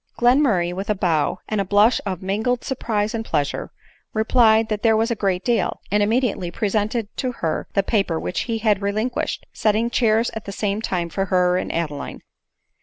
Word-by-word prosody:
Glenmurray, 240 -9 +3
with 195 +3 -5
a 210 - +2
bow, 170 -6 +1
and 215 -2 0
a - - +1
blush 205 +5 +3
of 185 -2 -4
mingled 220 +6 -1
surprise 220 -5 -1
and 225 -1 -2
pleasure, 150 -9 -2 0.4
replied 220 0 +4
that 215 -1 -2
there 225 -1 +4
was 225 +2 +1
a - - +1
great 195 -3 -1
deal 240 -2 0
— - - -28
and 210 +1 +3
immediately 215 -4 +1
presented 215 +3 -1
to 255 -2 -2
her 165 -8 -2
the 195 - +3
paper 195 -7 0
which - - -3
he 225 - 0
had 210 -3 +1
relinquished, 215 +5 -2
setting 220 +2 +1
chairs 230 -1 +2
at 220 - -7
the 200 - -5
same 205 +1 -2
time 175 -5 -2
for 195 +3 -1
her 180 -1 +2
and 185 - -2
Adeline. 150 -4 -4
210 Hz, 190 wpm, -22 LUFS, 190-225 Hz, 0.4 s, replied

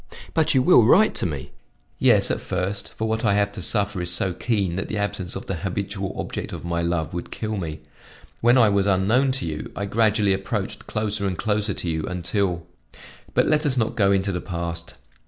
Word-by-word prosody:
"But 160 -3 +2
you 130 - +4
will 175 -8 +7
write 190 - +5
to - - +1
me?" 70 -3 -6 0.5
"Yes, - - +4
at - - -2
first, 95 +2 -3
for 110 - -2
what 110 0 -1
I 100 -3 +3
have 100 0 +1
to 100 - -7
suffer 100 0 +2
is 90 - -3
so 90 +1 0
keen 100 -4 -1
that 95 - -3
the 105 - -3
absence 100 -3 -3
of - - -6
the 95 - -3
habitual 95 +2 -4
object - - -4
of - - -7
my 85 0 -1
love 85 -2 -1
would 85 - -5
kill 110 -1 -4
me. 80 -5 -5 0.6
When 120 +2 +4
I 115 -3 +6
was 100 -1 +2
unknown 110 +8 +3
to 130 - -2
you, 75 -2 -5
I 100 - -2
gradually 105 -1 +2
approached 95 +1 -4
closer 105 -2 -1
and 90 -2 -2
closer 105 -2 -1
to - - -4
you 80 -1 -1
until 90 -1 -1 0.7
but - - +4
let 150 0 +3
us 140 -4 +2
not 115 -1 0
go 100 -4 +3
into 100 0 +1
the 90 - -3
past. 85 -2 -5
100 Hz, 210 wpm, -23 LUFS, 90-110 Hz, 0.7 s, will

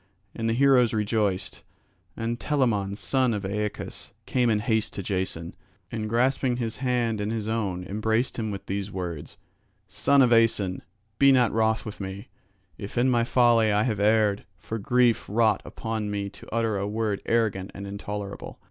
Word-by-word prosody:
And 115 0 -2
the 115 - +1
heroes 125 -3 +4
rejoiced, 105 -3 -1 0.6
and 115 +1 -2
Telamon 110 -9 0
son 130 -1 +1
of 100 -2 -4
Aeacus 105 +2 -4
came 125 -2 +1
in 110 - +3
haste 110 0 0
to 100 - -4
Jason, 90 -3 -3 0.4
and 110 -1 -3
grasping 125 +1 +1
his 115 -3 -3
hand 120 -4 0
in 105 - -2
his 110 -2 -3
own 100 -5 -2
embraced 110 +5 -1
him 110 -1 -2
with 100 -2 -6
these 100 +1 -3
words: 90 -5 -5 0.5
"Son 120 +9 +3
of 120 -1 +4
Aeson, 110 -5 +2 0.4
be 140 0 +7
not 125 -3 +4
wroth 110 0 +1
with 110 - -7
me, 95 +1 -6 0.5
if 100 +3 -7
in 125 +2 +3
my 120 -1 +3
folly 115 -3 +4
I 105 +1 +3
have 110 -5 -1
erred, 105 -1 +3
for 110 +6 -5
grief 120 +2 +2
wrought 110 +1 +2
upon 110 -2 -4
me 100 -1 -3
to 100 - -14
utter 115 -3 0
a 100 - -2
word 105 -1 -1
arrogant 105 -5 +1
and 100 - -6
intolerable. 100 0 -6
110 Hz, 170 wpm, -26 LUFS, 100-115 Hz, 0.6 s, be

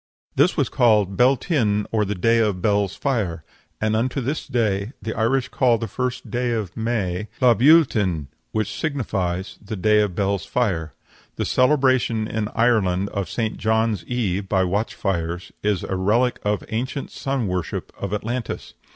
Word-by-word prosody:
This 155 +8 +3
was 140 -5 +2
called 105 -7 +3
Beltinne, 125 - +2
or 110 -2 +1
the 105 +1 -2
day 115 +5 +3
of 105 -4 +1
Bel's 100 -1 +1
fire. 100 - -1 0.4
And 110 0 +1
unto 125 +5 0
this 135 +5 -3
day 105 -1 0
the 110 - -4
Irish 125 +3 +1
call 125 -3 +3
the 115 - -4
first 125 +1 -4
day 120 -1 0
of 105 -5 -3
May 105 -4 -1
"Lha 125 -2 +6
Beul 155 +7 +7
tinne," 95 - -1 0.3
which 110 -2 -1
signifies 100 - -2
"the 105 +2 -5
day 105 +3 +3
of 100 -4 -1
Bel's 100 -1 0
fire." 85 -10 -1 0.4
The - - -2
celebration 130 -5 +2
in 110 -1 -2
Ireland 100 -5 +2
of 100 -2 -3
St. 110 -2 -2
John's 110 -3 +1
eve 100 -6 -2
by 95 -2 +3
watch 100 +5 -1
fires 90 0 -2
is 105 -3 0
a 95 - -3
relic 110 +7 +2
of 105 0 0
the - - -11
ancient 130 +5 -3
sun 135 -4 -2
worship 90 -2 -3
of 100 - -5
Atlantis. 115 +3 -4
110 Hz, 170 wpm, -22 LUFS, 100-125 Hz, 0.4 s, Beul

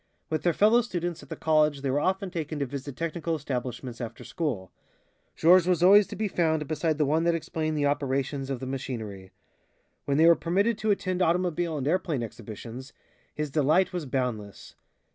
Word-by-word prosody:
With 155 - 0
their 175 - +2
fellow 220 +7 +5
students 175 -7 -4
at - - -15
the - - -4
college 155 -2 +2
they 135 - 0
were 140 - +1
often 190 +3 -1
taken 155 -2 -4
to 140 - -1
visit 140 +1 -6
technical 165 +2 -2
establishments 125 -3 -5
after 115 -1 -6
school. 125 - -3 0.6
Georges 175 +1 +5
was 175 -2 +2
always 200 +2 +7
to - - -7
be 215 - -1
found 160 -5 0
beside 155 +1 0
the 150 - +2
one 155 +4 +1
that 170 -1 +3
explained 155 -1 -2
the 145 - +1
operations 140 -1 -1
of 135 -3 -2
the 130 - -5
machinery. 110 -8 -5 0.8
When 140 0 +1
they 160 - +6
were 170 0 +8
permitted 200 +8 0
to 215 - -1
attend 185 -2 0
automobile 175 -2 +1
and 135 -1 -3
airplane 160 -6 0
exhibitions, 115 +4 -9 0.4
his 150 -2 -3
delight 155 +6 +2
was 175 -5 -3
boundless. 115 - -3
155 Hz, 185 wpm, -27 LUFS, 135-175 Hz, 0.8 s, were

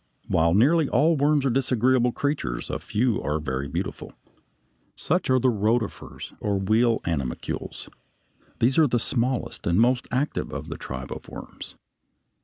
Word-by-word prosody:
While 85 +1 +3
nearly 145 +7 +4
all 155 +6 +3
worms 145 0 +2
are 135 - +2
disagreeable 125 -1 +2
creatures, 140 - -2
a - - -2
few 110 +1 0
are 75 +1 -1
very 70 -2 -3
beautiful. - - -5 0.8
Such 180 0 -1
are 130 - +5
the 130 0 +3
rotifers 110 +1 -2
or 100 -2 0
wheel 110 +4 +2
animalcules 70 -7 -3
(Fig. - - -17 0.6
65). - - -40
These 125 +3 +3
are 155 - +6
the 120 -2 +1
smallest 120 +2 -2
and 85 +3 +3
most 125 +2 +3
active 135 +4 -1
of - - -6
the - - -4
tribe 65 0 -7
of - - -7
worms. - - -10
120 Hz, 160 wpm, -25 LUFS, 95-130 Hz, 0.8 s, are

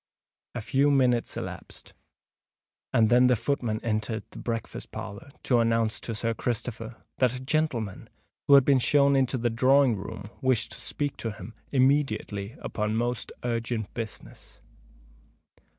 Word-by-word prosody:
A 120 - -3
few 140 +6 +2
minutes 125 -4 +2
elapsed, - - -8 1.0
and 110 -2 +4
then 125 +1 +6
the 125 - +4
footman 120 -3 -1
entered 110 0 -1
the - - -10
breakfast 115 -1 -4
parlour 100 +7 -8
to 125 -3 +3
announce 115 -1 +1
to 115 - -5
Sir 115 +2 -1
Christopher 115 0 -4 0.2
that 125 -1 +3
a - - -5
gentleman, 130 -7 -2 0.4
who 140 - +8
had 135 -2 +7
been 140 -2 +5
shown 140 +2 +4
into 130 -1 +2
the 120 -1 0
drawing 130 +1 +4
room, 100 +1 -7
wished 130 -3 +1
to - - -9
speak 145 -1 -3
to 115 - -3
him 105 0 -9 0.2
immediately 130 -7 +1
upon 105 0 -2
most 120 +1 -2
urgent 115 -3 -2
business. 115 -3 -8
120 Hz, 145 wpm, -27 LUFS, 110-130 Hz, 1.0 s, who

